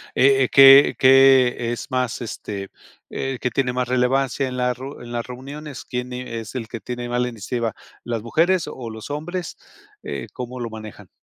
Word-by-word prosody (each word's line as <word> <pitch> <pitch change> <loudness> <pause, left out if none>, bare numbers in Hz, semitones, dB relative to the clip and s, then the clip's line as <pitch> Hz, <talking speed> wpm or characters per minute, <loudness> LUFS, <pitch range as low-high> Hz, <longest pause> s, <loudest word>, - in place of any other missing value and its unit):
Eh 135 +1 +5
eh, 130 - 0
¿qué 135 +1 +8
qué 130 -3 +5
es 120 - -7
más, 125 -2 -1
este, 100 -4 -6 0.4
eh, 135 -2 -4
que 125 - -1
tiene 125 0 0
más 125 -1 -2
relevancia 130 +2 +1
en 130 - -5
la 125 0 0
ru 130 +3 -9
en 120 - -10
las 120 -1 -3
reuniones? 140 +3 -8
¿Quién 125 0 -5
es 115 -2 -6
el 115 -3 -5
que 115 - -6
tiene 120 0 -6
más 120 - -1
la 125 - 0
iniciativa? 115 0 -3 0.3
¿Las 115 -2 -3
mujeres 170 +8 +1
o 120 -3 -7
los 110 +4 -9
hombres? 175 +5 -5 0.5
Eh, - - -5
¿cómo 125 0 -7
lo 115 - -3
manejan? 110 -4 -10
125 Hz, 185 wpm, -22 LUFS, 120-135 Hz, 0.5 s, qué